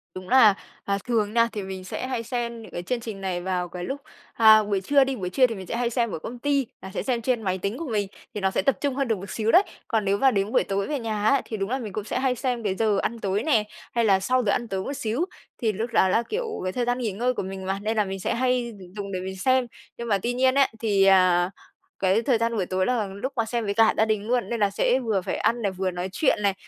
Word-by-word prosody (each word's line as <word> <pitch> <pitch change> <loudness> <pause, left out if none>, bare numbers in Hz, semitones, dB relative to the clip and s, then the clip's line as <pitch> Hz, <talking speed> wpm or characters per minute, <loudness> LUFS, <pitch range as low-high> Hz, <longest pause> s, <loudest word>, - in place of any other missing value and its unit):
Đúng 185 +2 -8
là, 235 -6 +7 0.3
à, 200 0 0
thường 215 -3 +1
nha, 230 0 +4
thì 205 -2 -4
mình 190 -1 -6
sẽ 250 +7 -5
hay 240 -3 -2
xem 235 -1 -3
những - - -12
cái 175 - -5
chương 245 +5 -2
trình 220 -4 -7
này 180 -2 -2
vào 180 -1 -2
cái 175 0 -6
lúc, 275 +7 -4 0.3
à, 220 -1 +7
buổi 200 -2 -1
trưa 280 +7 +4
đi, 265 0 -2
buổi 180 -5 -4
trưa 255 +6 +4
thì 230 - -5
mình 190 -2 -8
sẽ - - -3
hay 235 0 0
xem 235 -3 0
ở - - -4
công 240 +8 -7
ty, 280 -2 +1
là 190 - -8
sẽ - - -2
xem 245 -3 -1
trên 240 -1 0
máy 190 -2 -1
tính 200 +5 -3
của 330 -2 -5
mình, 205 -3 0 0.3
thì 210 - -4
nó 190 0 +2
sẽ - - +1
tập 270 - +2
trung 280 -3 0
hơn 275 -2 0
được 220 -3 +1
một 195 +2 -9
xíu 220 0 0
đấy, 370 +3 +7 0.2
còn 220 -3 0
nếu 200 +1 +2
mà 265 +2 +4
đến 200 +1 0
buổi - - +3
tối 195 0 -2
về 290 -3 -2
nhà 215 -2 -3
á, 275 -1 +3
thì 220 - -5
đúng 195 +2 -2
là 260 +1 -1
mình 210 -5 -6
cũng 215 - -3
sẽ 220 - -2
hay 260 -1 +1
xem 245 -2 -2
cái 190 -2 0
giờ 215 -1 +2
ăn 230 0 -2
tối 200 +2 -1
nè, 230 -9 +3 0.3
hay 230 -1 +3
là 195 -2 +4
sau 255 +5 +1
giờ 200 - +2
ăn 235 - -1
tối 190 -2 -3
một 280 - -4
xíu. 265 +4 -1 0.4
Thì 220 -2 +2
lúc 220 +4 -3
đó 190 - +4
là, 230 +5 +2
kiểu, 475 +2 -1 0.2
cái 185 - -1
thời 245 -1 -1
gian 245 0 0
nghỉ 235 -5 -2
ngơi 245 +6 0
của - - -3
mình 190 0 -6
mà, 195 +1 -2
nên 220 +1 -1
là 210 - +3
mình 190 0 -5
sẽ - - -1
hay 250 -2 0 0.2
dùng 200 -1 -5
để 185 - -2
mình 190 +1 -6
xem, 255 +4 +2 0.3
nhưng 235 0 -5
mà 200 -3 +3
tuy 245 +1 0
nhiên 260 +1 +3
ấy, 275 -1 +5
thì, 205 -4 +2
à, 185 -2 +5 0.5
cái 195 +4 +3
thời 240 -1 +2
gian 230 0 0
buổi 190 -4 0
tối 185 +1 0
là 235 -5 0
lúc 200 +8 -5
mà 230 -2 +1
xem 235 0 -2
với 200 - -1
cả 225 +1 +4
gia 220 - +4
đình 215 -1 -1
luôn 245 0 0
nên 235 -1 -2
là 205 -1 +3
sẽ 245 +6 +2
vừa 220 -6 0
phải 185 - -3
ăn 235 +1 +1
này, 200 -2 0
vừa 185 0 -2
nói 180 +2 -4
chuyện 285 - +2
này, 200 -1 +2
220 Hz, 300 wpm, -25 LUFS, 195-245 Hz, 0.5 s, là